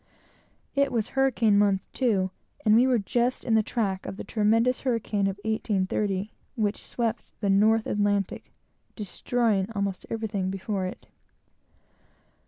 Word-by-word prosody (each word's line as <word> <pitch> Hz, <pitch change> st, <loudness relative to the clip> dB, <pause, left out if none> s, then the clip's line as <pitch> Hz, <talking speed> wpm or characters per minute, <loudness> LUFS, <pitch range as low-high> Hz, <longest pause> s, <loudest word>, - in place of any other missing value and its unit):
It 280 Hz, 0 st, +2 dB
was 225 Hz, -3 st, -1 dB
hurricane 245 Hz, -6 st, +3 dB
month, 200 Hz, -2 st, +3 dB
too, 200 Hz, -8 st, +1 dB, 0.3 s
and 215 Hz, -, +5 dB
we 245 Hz, +3 st, +5 dB
were 255 Hz, -2 st, +3 dB
just 240 Hz, +4 st, 0 dB
in 230 Hz, -, 0 dB
the 220 Hz, -, +5 dB
track 205 Hz, -4 st, -2 dB
of 195 Hz, -, -6 dB
the -, -, -5 dB
tremendous 225 Hz, +4 st, +2 dB
hurricane 220 Hz, -5 st, 0 dB
of 195 Hz, 0 st, -3 dB
1830, 205 Hz, -2 st, -1 dB, 0.2 s
which 210 Hz, -3 st, -1 dB
swept 230 Hz, -2 st, -2 dB, 0.2 s
the 200 Hz, -2 st, +1 dB
North 215 Hz, +3 st, +4 dB
Atlantic, 205 Hz, -2 st, -1 dB, 0.4 s
destroying 210 Hz, -1 st, 0 dB
almost 200 Hz, -2 st, -2 dB
everything 215 Hz, -4 st, -2 dB
before 190 Hz, 0 st, -2 dB
it. 185 Hz, -, -9 dB
210 Hz, 135 wpm, -27 LUFS, 195-230 Hz, 0.4 s, and